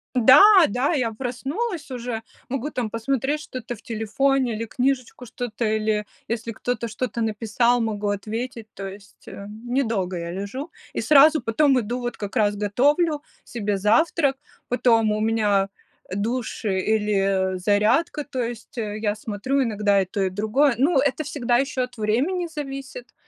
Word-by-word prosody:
Да, 255 - +8 0.3
да, 250 +9 0
я 250 -7 0
проснулась 275 - -4
уже, 240 -3 -4 0.3
могу, 270 +3 -3
там, 240 -6 -3
посмотреть 270 +6 -1
что-то 250 -5 -7
в 220 - -18
телефоне, 240 +3 0
или 230 - -3
книжечку 255 +1 -2
что-то, 240 -1 -4
или 215 -1 0 0.2
если 230 0 -3
кто-то 235 0 -3
что-то 235 +1 -3
написал, 225 +2 +1
могу 210 -2 -1
ответить. 220 +3 -4
То 195 -1 -6
есть, 200 +1 -14
э, 200 - -8
недолго 220 -4 -2
я 170 0 -5
лежу 230 - -5 0.2
и - - -1
сразу 305 +1 +6
потом 260 +4 +3
иду, 240 +2 -2
вот 240 -1 -4
как 205 -1 -6
раз 205 -4 +2
готовлю 290 - +2 0.2
себе 210 -4 -2
завтрак, 270 - +2 0.3
потом 230 -3 +3
у 210 - -1
меня 210 -3 +2 0.4
душ 225 +6 -3
или, 195 -1 +1
э, - - -3
зарядка, 210 - +2
то 265 -3 -3
есть, 235 0 -6
э, 210 -2 -3
я 210 -1 0
смотрю 220 +6 -1
иногда 210 -4 +2
и 185 - -4
то, 195 +1 -2
и 190 - 0
другое. 220 +8 +2
Ну, 280 +5 +3
это 285 +3 +1
всегда 250 -5 0
еще 270 -1 0
от 250 0 -5
времени 280 - 0
зависит. 275 - -7
230 Hz, 155 wpm, -23 LUFS, 210-265 Hz, 0.4 s, Да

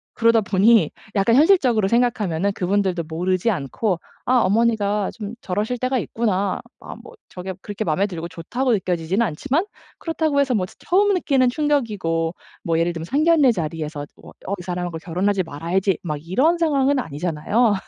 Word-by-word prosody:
그러다 230 -1 +4
보니 210 +3 +4 0.2
약간 205 +4 +3
현실적으로 265 - +4
생각하면은 210 -6 +1
그분들도 190 -2 0
모르지 180 +6 0
않고 175 - -2 0.3
'아 255 +1 +4
어머니가 210 -1 +1
좀 215 -1 -7
저러실 210 +6 -2
때가 255 +2 0
있구나.' 200 -5 -1 0.2
아 - - -9
뭐 460 - -13 0.2
저게 185 +1 -6
그렇게 205 +1 -4
맘에 185 +6 +1
들고 170 -3 -6
좋다고 230 +10 -2
느껴지지는 185 +2 0
않지만 275 - -1 0.3
그렇다고 315 -3 0
해서 275 -2 +2
뭐 190 -4 0
처 - - -15
처음 405 +3 +2
느끼는 275 -8 +2
충격이고 210 - 0 0.3
뭐 165 -1 0
예를 170 +1 +1
들면 165 -1 -6
상견례 295 - +4
자리에서 155 -5 -4 0.2
'어 - - -12 0.3
이 - - -8
사람하고 175 -2 -4
결혼하지 190 +3 0
말아야지.' 170 +4 -1
막 155 -4 -3
이런 280 - +2
상황은 285 -4 +2
아니잖아요 175 - 0
205 Hz, 390 characters per minute, -22 LUFS, 175-250 Hz, 0.3 s, 그러다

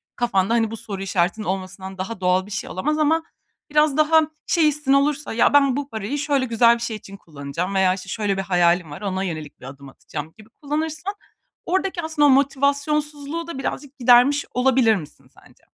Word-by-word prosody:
Kafanda, 220 -3 +1
hani, 225 -2 +1
bu 225 - -5
soru 200 -3 -7
işaretinin 195 +3 -1
olmasından 190 0 -5
daha 190 +2 -5
doğal 180 +1 +2
bir 210 - -13
şey 195 - -4
olamaz 300 +12 -1
ama 320 +2 +2 0.5
biraz 300 -1 +3
daha 315 +1 +5 0.3
şey 330 -3 +3
hissin 295 -2 +1
olursa, 280 -1 +1
"Ya, 230 - +3
ben 275 -3 +4
bu 285 0 -4
parayı 220 +4 -4
şöyle 285 -2 0
güzel 235 0 +4
bir 235 - -8
şey 230 -2 -3
için 200 -1 -12
kullanacağım 165 +4 -5
veya 190 -1 +3
işte 185 -1 -8
şöyle 205 -3 -1
bir - - 0
hayalim 175 -3 +2
var, 145 - -9
ona 190 -2 -2
yönelik 155 -5 -6
bir - - -12
adım 135 +1 -11
atacağım." 155 +3 -8
gibi 215 0 -16
kullanırsan 310 - -4 0.5
oradaki 375 0 -1
aslında 315 -2 +1
o - - +6
motivasyonsuzluğu 285 +3 0
da 335 - -6
birazcık 280 +1 -5
gidermiş 250 +4 +5
olabilir 250 -3 +3
misin 155 -6 -9
sence? - - -22
235 Hz, 190 wpm, -22 LUFS, 190-290 Hz, 0.5 s, o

